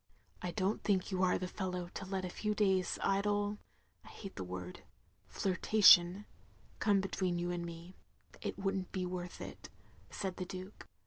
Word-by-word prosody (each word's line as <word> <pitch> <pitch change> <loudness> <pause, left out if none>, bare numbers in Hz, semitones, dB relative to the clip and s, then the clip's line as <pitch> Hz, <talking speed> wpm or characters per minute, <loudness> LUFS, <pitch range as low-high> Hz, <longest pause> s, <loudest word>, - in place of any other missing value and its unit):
" - - -32
I 180 - -2
don't 195 +3 0
think 195 -1 +1
you 185 -1 0
are 185 -1 +4
the 185 - -3
fellow 180 -2 -3
to 190 - -6
let 190 -1 -2
a - - -3
few 210 +2 -1
days' 190 -3 +2
idle 205 +1 +1 0.2
— - - -40
I - - -16
hate 195 - -9
the 95 - -4
word 90 0 -6 0.2
— 95 +2 -33
^flirtation, 190 -1 +6 0.3
— - - -29
come 200 -2 +4
between 185 -2 -1
you 175 +1 -1
and 175 -1 -2
me; 170 +2 -9 0.4
it - - -4
wotdd 195 0 0
n't 185 - -8
be 185 -1 -2
worth 180 0 -5
it," - - -8 0.4
said 190 -3 -4
the 185 - -3
Duke. 185 +3 -8
185 Hz, 195 wpm, -34 LUFS, 175-195 Hz, 0.4 s, ^flirtation